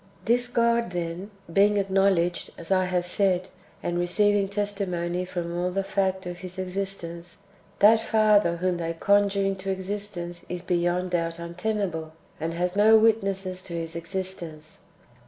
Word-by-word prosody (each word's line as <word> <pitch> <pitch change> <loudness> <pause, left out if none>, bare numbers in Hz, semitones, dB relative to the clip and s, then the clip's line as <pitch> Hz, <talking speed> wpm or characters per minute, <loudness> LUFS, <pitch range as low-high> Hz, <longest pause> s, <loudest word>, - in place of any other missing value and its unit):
2. 235 - +4
This 245 0 +1
God, 235 -2 +2
then, 175 +2 -4 0.2
being 205 +2 +4
acknowledged, 190 -3 +2
as 170 +2 -8
I 185 -1 +4
have 180 -1 0
said, 185 0 +1 0.3
and 175 0 -1
receiving 200 +3 +2
testimony 185 -4 -2
from 175 -2 -4
all 175 +1 0
to 180 - -4
the 195 - +1
fact 190 -1 -1
of 175 0 -6
His 185 0 -9
existence, 180 -2 -5 0.4
that 220 +2 +6
Father 210 -6 +3
whom 180 0 0
they 165 -1 -2
conjure 200 +3 +2
into 195 0 -2
existence 190 -2 -4
is 180 0 -4
beyond 180 0 0
doubt 165 -1 -1
untenable, 170 -2 -3 0.3
and 165 +1 -3
has 180 +2 -1
no 215 +2 +7
witnesses 195 -4 +1
[to 180 - -8
his 165 0 -4
existence]. 170 -3 -5
185 Hz, 155 wpm, -26 LUFS, 175-200 Hz, 0.4 s, no